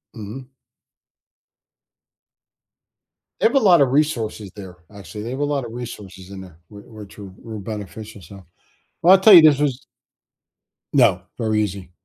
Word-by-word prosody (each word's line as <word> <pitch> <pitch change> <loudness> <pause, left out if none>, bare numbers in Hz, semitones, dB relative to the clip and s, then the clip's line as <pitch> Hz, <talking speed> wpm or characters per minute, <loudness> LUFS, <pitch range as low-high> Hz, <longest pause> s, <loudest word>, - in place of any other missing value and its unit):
Mhm. 125 +5 -10 2.9
They - - -1
have 240 - -4
a - - +5
lotta 175 - +4
resources 125 -8 -2
there, 95 -3 -11 0.2
actually, 100 +1 -10
they 120 - -6
have 130 - -6
a 145 - -1
lotta 140 -4 -3
resources 105 -6 -10
in 100 -1 -10
there, 90 -3 -15
where 100 -1 -14
where 110 -2 -13
true 100 -1 -13
real 110 -3 -8
beneficial 105 +1 -9
stuff. 95 +3 -14 0.6
Well, 180 +3 +6
I - - +7
tell 195 +2 +6
you 170 - +10
this 150 -3 +4
was 140 -2 -2 1.1
No, - - +3 0.2
very 110 -1 0
easy, 95 -3 -6
110 Hz, 150 wpm, -20 LUFS, 100-140 Hz, 2.9 s, you